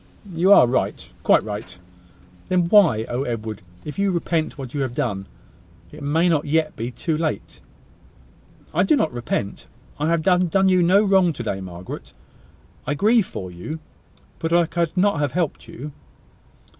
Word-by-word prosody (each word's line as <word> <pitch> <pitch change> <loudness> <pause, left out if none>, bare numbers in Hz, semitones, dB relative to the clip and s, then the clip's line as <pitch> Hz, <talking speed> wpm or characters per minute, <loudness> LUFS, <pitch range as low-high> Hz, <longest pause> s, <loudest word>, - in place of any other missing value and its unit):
"You 175 +4 +3
are 200 - +9
right: 125 +2 -1
quite - - +4
right." 105 -3 -7 0.7
"Then 185 -1 +3
why. 170 - +5
Oh! 120 +2 -2
Edward, 110 -5 -4 0.2
if 150 +6 -6
you 200 0 +2
repent 170 -3 -1
what 130 -3 -7
you 145 - -2
have 130 -3 -3
done, 100 -5 -2 0.6
it - - -11
may 155 +5 +2
not 160 -4 +2
yet 155 +1 0
be 115 +2 -4
too 160 +6 -2
late!" 155 0 -3 1.1
"I - - +2
do 310 - +4
not 160 - 0
repent. 115 -4 -3 0.3
I 150 +2 0
have 165 -1 +1
done 185 +1 +3
you 185 -1 +4
no 185 +4 +5
wrong 190 -4 +4
to 120 - -6
day, 95 -3 -3
Margaret. 90 -1 -8 0.7
I 145 - 0
grieve 215 +5 +3
for 95 -1 -7
you, 90 - -6 0.6
but 165 - -2
I 170 0 +4
could 170 +1 -2
not 200 -3 +3
have 145 -2 -1
helped 170 -3 -2
you." 145 +5 -8
155 Hz, 170 wpm, -22 LUFS, 120-180 Hz, 1.1 s, are